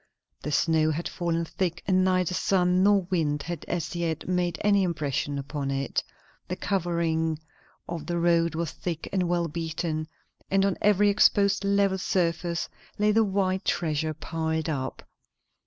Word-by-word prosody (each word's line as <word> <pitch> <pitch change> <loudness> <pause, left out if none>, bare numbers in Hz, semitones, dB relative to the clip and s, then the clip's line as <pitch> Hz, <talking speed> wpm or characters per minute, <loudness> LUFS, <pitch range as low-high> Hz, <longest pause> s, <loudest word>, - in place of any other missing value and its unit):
The 150 - -4
snow 155 +1 +3
had 155 +2 -2
fallen 170 -1 -1
thick, 170 0 -2
and 185 -1 +4
neither 185 -1 +2
sun 180 -1 +2
nor 200 0 +5
wind 150 -5 0
had 175 -1 -5
as 175 0 -3
yet 165 -2 -2
made 175 -2 0
any 200 -1 +4
impression 145 -5 -1
upon 140 0 -4
it; 135 0 -1 0.4
the 180 - -3
covering 170 -4 0 0.5
of 170 -2 -5
the 175 - -1
road 170 -1 +2
was 165 -1 -2
thick 165 -3 -5
and 180 -3 +1
well 175 -1 +1
beaten, 160 -1 -3 0.4
and 195 0 +3
on 195 -2 +1
every 205 0 +4
exposed 200 -1 +4
level 200 -1 +2
surface 170 -2 0 0.3
lay 210 +1 +3
the 225 +1 +4
white 190 -2 0
treasure 155 -2 0
piled 160 0 -2
up. 135 -4 -3
170 Hz, 155 wpm, -27 LUFS, 160-185 Hz, 0.5 s, nor